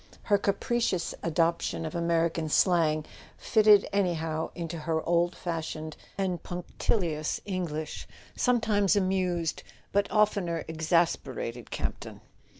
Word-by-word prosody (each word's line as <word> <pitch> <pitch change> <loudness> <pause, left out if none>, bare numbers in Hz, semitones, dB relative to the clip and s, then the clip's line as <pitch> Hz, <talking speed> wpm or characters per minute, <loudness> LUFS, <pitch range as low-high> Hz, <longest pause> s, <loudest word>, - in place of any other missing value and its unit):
Her 205 -2 +3
capricious 200 -2 0
adoption 165 0 0
of 155 - -5
American 170 -1 0
slang, 155 -3 +3 0.3
fitted 210 -2 +5
anyhow 165 -5 0
into 170 -1 -4
her 160 +1 -1
old 175 +1 +2
fashioned 160 -2 -4 0.2
and 185 -3 -1
punctilious 175 -2 -2
Eng¬ 185 -4 -2
lish, 155 +1 -5 0.3
sometimes 220 -6 +2
amused 185 -4 0 0.3
but 200 0 +1
oftener 200 -6 +1
exasperated 160 -7 -1
Camp - - -3
ton. - - -10
170 Hz, 110 wpm, -28 LUFS, 160-195 Hz, 0.3 s, fitted